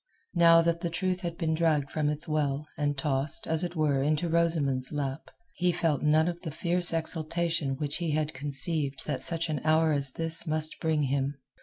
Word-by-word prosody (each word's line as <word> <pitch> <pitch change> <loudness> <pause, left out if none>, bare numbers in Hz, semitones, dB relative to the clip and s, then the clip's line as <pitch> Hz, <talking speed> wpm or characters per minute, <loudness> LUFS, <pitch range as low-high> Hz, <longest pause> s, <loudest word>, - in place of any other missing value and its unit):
Now 165 -1 +5
that 170 0 -1
truth 185 0 -2
had 170 -2 -5
been 160 -2 -1
dragged 155 -4 0
from 150 -2 -1
its 150 0 -3
well, 150 -2 -1
and 145 -1 -2
tossed, 140 0 +2
as 160 +1 -1
it 175 0 -4
were, 145 -4 +1
into 150 +4 0
Rosamund's 160 -6 0
lap, 140 -1 -4 0.2
he 180 0 0
felt 165 -4 -1
none 155 +2 +3
of 175 -1 -4
the 165 - -5
fierce 175 +3 +3
exultation 160 -3 -1
which 145 -1 -3
he 170 -2 -3
had 155 0 -1
conceived 140 +1 +1
that 135 -4 -3
such 165 +3 +3
an 150 -4 -3
hour 160 +1 +3
as 140 -3 +2
this 165 +1 -3
must 155 0 -1
bring 160 -2 0
him. 140 +1 -1
155 Hz, 190 wpm, -28 LUFS, 145-165 Hz, 0.2 s, Now